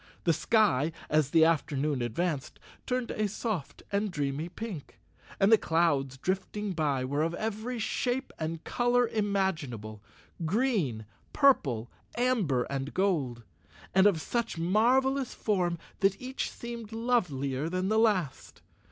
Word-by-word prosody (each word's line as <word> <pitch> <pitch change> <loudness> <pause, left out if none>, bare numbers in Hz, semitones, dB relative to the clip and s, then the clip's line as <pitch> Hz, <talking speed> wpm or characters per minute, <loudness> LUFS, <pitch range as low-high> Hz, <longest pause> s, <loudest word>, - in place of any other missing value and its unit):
The 165 - +3
sky, 165 - +2 0.2
as 150 -2 +3
the 160 +1 +5
afternoon 150 -3 +1
ad¬ 120 -1 -1
vanced, 155 +2 -2 0.3
turned 250 -1 -1
a 215 0 0
soft 205 - -4
and 205 +1 0
dreamy 145 0 -2
pink, 185 -5 -7 0.4
and 195 +2 +4
the 225 - +7
clouds 145 -5 +1
drifting 195 +5 -2
by 145 -6 0
were 145 +3 -1
of 165 +2 0
every 220 +4 -3
shape 245 +3 -1
and 160 0 -3
color 245 0 +2
imaginable 165 - -2 0.4
—green, 170 - 0 0.3
purple, 135 - +3 0.3
amber 215 - +2
and 140 0 -4
gold—and 120 - 0
of 190 -6 +2
such 230 +2 -2
mar¬ 215 +10 +3
velous 265 -1 -2
form 180 -5 0 0.2
that 195 -1 +2
each 260 +1 -3
seemed 235 -2 -8
lovelier 160 - 0
than 185 +2 -1
the 220 +1 +3
last. 190 -11 0
180 Hz, 135 wpm, -29 LUFS, 140-220 Hz, 0.4 s, the